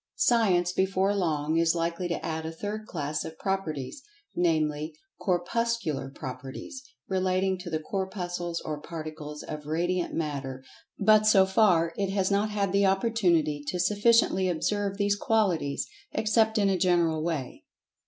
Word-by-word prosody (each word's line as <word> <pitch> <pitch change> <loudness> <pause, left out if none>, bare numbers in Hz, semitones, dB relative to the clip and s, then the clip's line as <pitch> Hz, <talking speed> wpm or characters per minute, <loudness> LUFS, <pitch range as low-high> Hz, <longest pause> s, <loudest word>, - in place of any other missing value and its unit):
Science, 185 -7 +3
before 190 +1 +1
long, 160 -4 0
is 165 0 +3
likely 170 +2 -1
to 170 - -3
add 160 0 -3
a 160 - -4
third 210 +5 -5
class 150 -2 -3
of 160 - -8
Properties, 190 - -3 0.3
namely, 155 -2 0 0.2
"Corpuscular 185 -5 -1
Properties," 135 - -7 0.3
relating 190 0 +1
to 180 -1 -7
the 160 - 0
Corpuscles 175 -1 -3
or 150 -1 -5
particles 155 -2 -7
of 150 -1 -7
Radiant 175 +3 -1
Matter, 135 -4 -3 0.3
but, 215 +1 +5
so 195 -3 +6
far, 185 -5 +3
it 195 -1 0
has 195 0 0
not 205 +2 +2
had 200 -2 -1
the 200 0 +3
opportunity 180 -8 +2
to 180 - -2
sufficiently 205 0 +3
observe 195 +4 -1
these 205 0 +2
qualities, 195 -10 0 0.3
except 220 +1 +2
in 205 -2 +3
a 190 -2 +1
general 170 -3 +2
way. 155 -7 -4
180 Hz, 145 wpm, -28 LUFS, 160-200 Hz, 0.3 s, so